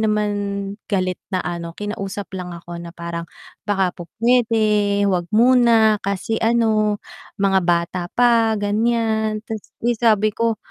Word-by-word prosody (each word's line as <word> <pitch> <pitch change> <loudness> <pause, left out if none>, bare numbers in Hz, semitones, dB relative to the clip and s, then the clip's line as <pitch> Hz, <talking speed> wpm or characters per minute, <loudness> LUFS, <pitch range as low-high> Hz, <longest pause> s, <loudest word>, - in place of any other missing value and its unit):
naman 210 -1 +1 0.6
galit 185 -3 0 0.2
na 185 - +1
ano, 170 -1 -4
kinausap 205 -1 -5
lang 180 -1 -6
ako 170 0 -9
na 170 -1 -9
parang, 170 -1 -5 0.4
"Baka 195 -3 +1
po 170 -2 -9
pwede, 215 -4 +2
wag 180 -2 0
muna, 230 -2 +5
kasi 200 +3 -2
ano, 220 -2 +2 0.4
mga 195 -1 +3
bata 175 +1 0
pa." 230 -2 +4
ganyan. 220 0 0
Ta's, 220 -2 -7
eh, 240 0 +2
sabi 215 -2 +3
ko, 230 +1 0
210 Hz, 135 wpm, -20 LUFS, 185-225 Hz, 0.6 s, muna